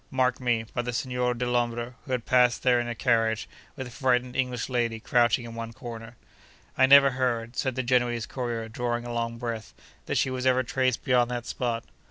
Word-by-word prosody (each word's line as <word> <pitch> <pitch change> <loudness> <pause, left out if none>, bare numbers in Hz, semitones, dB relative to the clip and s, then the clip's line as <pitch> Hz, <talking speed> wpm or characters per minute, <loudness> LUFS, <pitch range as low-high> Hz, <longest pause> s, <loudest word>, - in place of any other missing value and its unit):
Mark 130 -1 +1
me! 120 -3 +1
by 120 - 0
the 120 0 -4
Signor 125 0 -1
Dellombra, 120 0 -1
who 135 - -8
had 125 -2 -1
passed 125 -1 +3
there 125 -2 +4
in 120 - -2
a 120 - -3
carriage, 115 -3 +1 0.3
with 130 - -5
a 125 - -9
frightened 125 0 0
English 125 -3 -1
lady 120 -3 -1
crouching 120 0 +2
in 115 - -8
one 115 0 -6
corner. 115 0 -9 0.6
I 130 - +5
never 140 0 +8
heard 120 -2 -1
(said 130 0 -1
the 130 - -1
Genoese 120 -2 +1
courier, 120 -3 -4
drawing 120 +1 -3
a 120 - -5
long 115 0 -2
breath) 115 -2 -5 0.3
that - - 0
she 130 - +1
was 130 0 -1
ever 130 0 +3
traced 130 0 0
beyond 125 -3 +3
that 120 -1 -4
spot. 120 -2 -2
120 Hz, 205 wpm, -27 LUFS, 115-125 Hz, 0.6 s, never